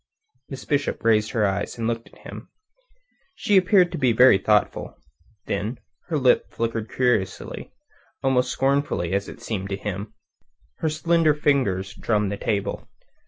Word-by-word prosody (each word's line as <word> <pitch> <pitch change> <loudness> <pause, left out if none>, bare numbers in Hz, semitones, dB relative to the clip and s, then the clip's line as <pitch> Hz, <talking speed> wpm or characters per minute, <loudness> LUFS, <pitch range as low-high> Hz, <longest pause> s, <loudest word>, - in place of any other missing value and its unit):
Miss 135 -2 -8
Bishop 145 -1 -1
raised 110 -1 +3
her 110 -3 +1
eyes, 100 +3 -2
and 115 - -3
looked 115 0 -2
at - - -20
him. - - -9 0.9
She 205 - +1
appeared 185 -1 +4
to 170 - -4
be 125 -4 +3
very 125 -3 +6
thoughtful. 105 +1 0 0.5
Then 105 +5 -3 0.3
her 165 -3 -1
lip 130 -3 +3
flickered 115 -1 -3
curiously, 120 -7 -1 0.5
almost 130 -1 +2
scornfully, 135 -11 0
it 100 0 -3
seemed 100 -3 -4
to 100 - -2
him. 100 0 -6 0.6
Her 160 - 0
slender 160 0 +2
fingers 105 -11 0
drummed 105 -3 -1
the 100 - -3
table. 100 -2 -2
115 Hz, 145 wpm, -23 LUFS, 100-140 Hz, 0.9 s, very